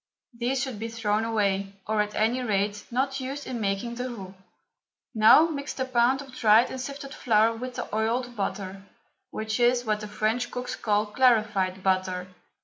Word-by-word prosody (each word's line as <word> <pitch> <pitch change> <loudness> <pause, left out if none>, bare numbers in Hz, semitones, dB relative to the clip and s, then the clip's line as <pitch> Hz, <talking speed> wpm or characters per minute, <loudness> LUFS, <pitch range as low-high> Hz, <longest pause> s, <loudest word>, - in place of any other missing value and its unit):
These 250 +3 -1
should 260 -6 -5
be 225 - -3
thrown 220 -2 -1
away, 200 -3 0
or, 215 0 +1
at 210 0 -3
any 230 +4 +1
rate, 205 -3 -1
not 270 +3 -1
used 270 +2 -5
in 240 -3 -4
making 200 +3 -1
the 250 +2 -4
roux. 195 -6 -8 0.8
Now 220 +8 +7
mix 290 -4 -4
the 260 - -2
pound 255 +2 +2
of 265 -2 -14
dried 225 -1 +5
and 260 - -5
sifted 275 +1 -7
flour 225 -3 +2
with 250 +2 -6
the - - -4
oiled 240 +3 -1
butter, 195 -2 -4 0.5
which 220 +2 -3
is 245 0 +3
what 215 -1 0
the 210 - -6
French 215 +3 -1
cooks 250 0 -4
call 210 -1 +1
clarified 210 -5 +2
butter. 185 -1 0
225 Hz, 175 wpm, -26 LUFS, 210-250 Hz, 0.8 s, Now